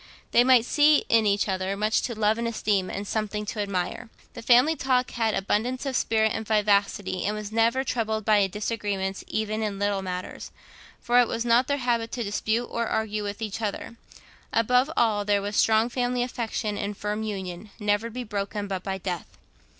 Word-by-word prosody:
They 240 - +6
might 250 -2 +5
see 295 +3 +4
in 225 -2 +4
each 200 +1 +2
other 190 0 -2
much 215 +2 +1
to 235 -3 -4
love 215 +1 +2
and 235 - -1
esteem, 205 -4 0
and 200 +1 -5
something 210 -1 -2
to 210 - -5
admire. 200 +2 -3 0.2
The - - -8
family 250 +7 +5
talk 255 -3 +1
had 225 -2 0
abundance 240 +7 -1
of 270 -2 -2
spirit 220 -2 +2
and 220 - -3
vivacity, 200 -3 +1
and 210 +2 -1
was 210 -1 -6
never 230 +4 +2
troubled 220 -4 -2
by 210 -3 +4
disagreements 205 -2 -3
even 215 0 -2
in 210 -2 -2
little 200 -1 0
matters, 180 -1 -6 0.5
for 240 +1 +3
it 245 - +4
was 230 +1 -3
not 240 +2 +4
their 285 0 0
habit 235 -3 -1
to 240 - -2
dispute 220 +3 -1
or 235 -1 -3
argue 215 -1 -1
with 205 +2 -5
each 215 +1 -4
other: 215 +2 -4 0.6
above 250 +4 +3
all, 215 -3 +2
there 205 0 +2
was 205 +1 -4
strong 220 +1 +4
family 245 0 -1
affection 225 -3 -3
and 205 0 -4
firm 210 +1 -3
union, 195 -2 -5
never 210 +1 +1
to - - -9
be 250 +2 -5
broken 205 -1 -3
but 190 -2 -3
by 190 0 -3
death. 180 -3 -6
215 Hz, 195 wpm, -26 LUFS, 205-235 Hz, 0.6 s, They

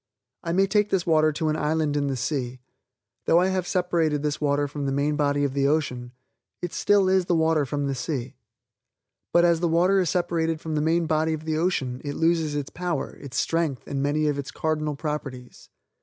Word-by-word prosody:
I 165 - -2
may 190 +3 +3
take 210 +1 +1
this 190 -3 0
water 155 -2 +3
to 155 +1 -1
an 155 - 0
island 155 -1 0
in 145 -1 0
the 135 - -1
sea. 130 -1 -3 0.7
Though 170 - +5
I 185 +1 +2
have 185 -2 -1
separated 165 -5 0
this 150 0 -2
water 145 0 +1
from 145 0 -4
the - - 0
main 145 +2 0
body 145 -1 +1
of 140 -2 0
the 140 0 +2
ocean, 125 -5 -1 0.5
it 175 - -5
still 200 -2 +3
is 190 -1 +3
the 175 - +1
water 160 -3 +2
from 145 +2 -2
the 140 - -1
sea. 130 -1 -4 1.0
But, 175 0 +5
as 170 -1 +3
the 175 - +1
water 180 +4 +3
is 180 -4 +1
separated 165 -2 0
from 160 0 -5
the 150 - 0
main 165 +2 +2
body 160 0 +1
of 155 0 -6
the 160 -1 -1
ocean, 135 -8 -1
it 145 -1 -4
loses 165 -2 +1
its 145 -2 -3
power, 175 -4 -3
its 140 -2 -7
strength 165 -6 -1
and 140 -1 -3
many 150 +2 +1
of 145 -1 0
its 140 - -5
cardinal 155 -2 -2
properties. 140 -5 -6
155 Hz, 215 wpm, -25 LUFS, 145-170 Hz, 1.0 s, Though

